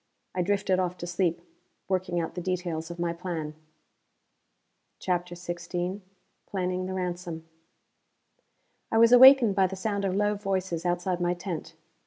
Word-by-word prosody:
I 180 - 0
drifted 195 0 +1
off 180 -1 -1
to 175 - -6
sleep, 175 -1 0 0.5
working 185 -2 -1
out 165 - -3
the 180 - -5
details 175 -3 -3
of 170 - -7
my 170 -1 -1
plan. 170 -3 -5 1.4
CHAPTER 175 -1 -2
XVI 175 +2 -4 0.5
Planning 185 -1 -2
The 190 - -4
Ransom 175 -3 -4 1.4
I 225 - +2
was 230 +1 +6
awakened 250 -3 +9
by 190 -1 +3
the 190 - -6
sound 200 +1 -2
of 190 -1 0
low 205 +1 +2
voices 190 -4 -2
outside 175 +1 -1
my 175 0 +1
tent. 175 -2 -6
180 Hz, 145 wpm, -27 LUFS, 175-190 Hz, 1.4 s, awakened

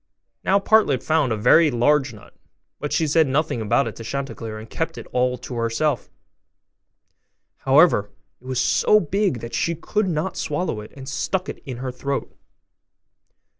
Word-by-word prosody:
Now 195 - +3
Partlet 200 - +3
found 155 -5 +1
a 110 - 0
very 150 +9 +5
large 135 +2 +2
nut; 105 -3 -15 0.5
but 150 - -4
she 160 - +1
said 155 0 +3
nothing 135 -3 0
about 110 +1 +2
it 110 - -6
to 115 - -8
Chanticleer, 115 -3 -5
and 110 +1 -9
kept 165 +6 -4
it - - -7
all 125 0 +1
to 125 +1 -9
herself: 120 +4 -1 1.5
however, 135 - +4 0.3
it 130 - -14
was 130 -1 -1
so 210 +10 +4
big 185 - -1
that 115 - -8
she 170 - 0
could 210 +5 -1
not 165 +3 -2
swallow 150 -7 -2
it, 105 - -11
and 135 - -12
it - - -11
stuck 180 +7 -2
in 130 -5 -7
her 130 +1 -4
throat. 140 +2 -4
135 Hz, 170 wpm, -22 LUFS, 120-160 Hz, 1.5 s, very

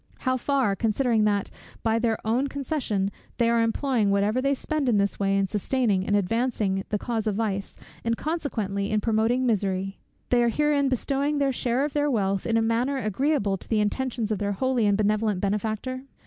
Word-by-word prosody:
how 255 -1 +1
far, 255 -5 +1
considering 225 0 +1
that, 205 -2 0 0.3
by 225 0 +2
their 225 -2 +1
own 245 +5 +1
concession, 265 -9 -2 0.3
they 235 - +3
are 235 0 +3
employing 230 -1 +1
whatever 205 +5 +2
they 275 +1 +2
spend 295 0 -1
in 220 - +3
this 200 0 0
way, 195 0 +2
in 195 - +2
sustaining 205 0 0
and 205 - +2
advancing 205 -1 0
the 210 - 0
cause 225 0 -2
of 210 - 0
vice, 200 -3 -2 0.3
and 230 0 0
consequently 220 - -2
in 215 - +1
promoting 225 +4 +1
misery; 195 -4 -1 0.3
they 245 -1 +4
are 235 - +3
herein 290 +1 +2
bestowing 275 +3 0
this 275 -2 +1
share 250 +3 +1
of 295 - -4
their 295 0 +1
wealth 195 -6 0
in 230 -1 +2
a 225 - +2
manner 240 +5 +1
agreeable 215 -2 0
to - - -16
the 220 - +2
intentions 225 +1 -1
of 210 - -1
their 205 0 -1
holy 250 +1 +1
and 200 -1 +3
benevolent 210 -1 +1
Benefactor? 215 +6 -2
225 Hz, 190 wpm, -26 LUFS, 205-260 Hz, 0.3 s, they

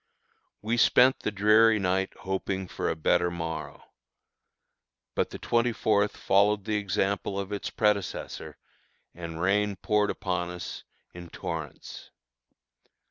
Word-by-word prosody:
We 115 +2 0
spent 125 +2 +5
the - - -2
dreary 110 +2 +5
night 95 0 0
hoping 95 0 -3
for - - -3
a - - -1
better 90 +2 +2
morrow. 80 -1 -5 1.3
But - - 0
the - - -7
twenty 120 +1 +1
fourth 105 -2 +1
followed 100 +1 +2
the 110 - -2
example 100 0 -1
of 100 +1 -5
its 100 - -3
predecessor, 105 -3 -1 0.6
and 85 -1 -7
rain 100 +3 +1
poured 105 +1 +1
upon 90 -1 -2
us 90 0 -7 0.3
in 85 -1 -10
torrents. 80 -5 -7
100 Hz, 125 wpm, -28 LUFS, 90-105 Hz, 1.3 s, spent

